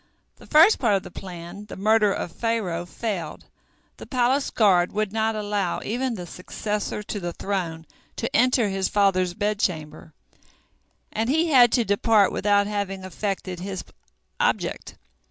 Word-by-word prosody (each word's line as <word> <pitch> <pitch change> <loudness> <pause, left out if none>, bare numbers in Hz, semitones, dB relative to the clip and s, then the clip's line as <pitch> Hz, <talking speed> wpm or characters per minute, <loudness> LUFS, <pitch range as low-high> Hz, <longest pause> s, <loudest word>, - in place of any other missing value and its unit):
The - - -16
first 325 +8 +6
part 220 -5 +3
of 195 - -1
the - - -10
plan, 180 +2 -9
the - - -8
murder 210 +1 +3
of 175 - -3
Pharaoh, 190 -6 -2
failed. 180 -6 -5 0.5
The - - -10
palace 260 +2 +1
guard 185 -5 +3
would 210 -1 -1
not 220 0 0
allow 205 -4 -1
even 245 +2 -1
the 180 -4 -6
successor 210 +4 -4
to 205 - -4
the 175 -2 -4
throne 170 -5 -3 0.3
to 230 - -3
enter 250 -2 +4
his 195 -1 0
father's 185 -3 +2
bedchamber, 160 - -2 1.0
and 225 +2 -1
he 320 +4 +2
had 245 -5 +6
to 240 -3 +3
depart 205 0 +3
without 205 0 +2
having 200 -2 -3
effected 190 -1 -4
his 190 0 -5 0.6
object. - - -1
205 Hz, 150 wpm, -24 LUFS, 185-225 Hz, 1.0 s, first